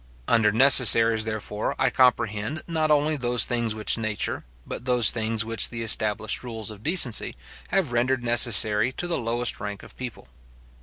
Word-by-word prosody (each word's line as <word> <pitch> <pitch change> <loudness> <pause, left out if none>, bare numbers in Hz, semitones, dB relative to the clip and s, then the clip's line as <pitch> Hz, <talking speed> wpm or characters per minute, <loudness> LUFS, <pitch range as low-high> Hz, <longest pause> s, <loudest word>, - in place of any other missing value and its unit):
Under 110 -3 +2
necessaries, 115 -2 +5
therefore, 110 -1 -5
I - - 0
comprehend, 115 +1 0
not 160 -2 -2
only 150 +1 +1
those 125 -3 0
things 120 -3 -3
which 110 +1 -2
nature, 110 -2 -4 0.2
but - - -7
those 125 -4 +4
things 115 -1 -2
which 115 0 0
the 115 -1 -6
established 110 -1 0
rules 110 -4 -6
of 105 -1 -13
decency 150 - +1 0.3
have 180 -10 -1
rendered 120 +1 -1
necessary 120 -1 +3
to 175 - -5
the 175 -3 -3
lowest 120 0 -2
rank 100 -1 -7
of - - -15
people. 125 -3 -9
115 Hz, 160 wpm, -23 LUFS, 110-125 Hz, 0.3 s, necessaries